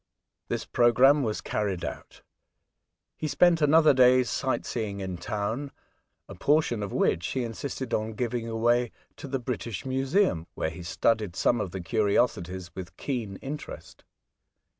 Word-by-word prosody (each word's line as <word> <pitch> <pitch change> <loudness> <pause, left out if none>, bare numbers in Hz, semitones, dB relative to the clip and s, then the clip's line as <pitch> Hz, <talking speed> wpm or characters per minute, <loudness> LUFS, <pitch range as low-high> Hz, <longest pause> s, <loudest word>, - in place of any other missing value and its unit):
This - - -3
programme 125 +5 +5
was 110 -5 -2
carried 100 -5 -2
out. - - -8 0.9
He 155 - -3
spent 170 +2 +4
another 155 +1 +6
day's 125 -1 +5
sight 130 -1 -1
seeing 105 -4 -3
in 95 -2 -4
town, 110 +9 -3 0.6
a - - -9
portion 145 -7 +1
of 100 - -4
which 85 - +1
he 130 - -2
insisted 120 +2 -5
on 110 +1 -1
giving 115 +1 -2
again 120 +2 +2 0.3
to - - -8
the 135 0 -1
British 120 -4 -4
Museum, 130 - +1
where 80 - -2
he 80 - -9
studied 105 +2 0
some 120 +3 +2
of 95 - -3
the 95 +2 -6
curiosities 95 -2 0
with 90 -1 -8
keen 115 -8 -3
interest. 145 +2 -8
115 Hz, 145 wpm, -27 LUFS, 100-135 Hz, 0.9 s, another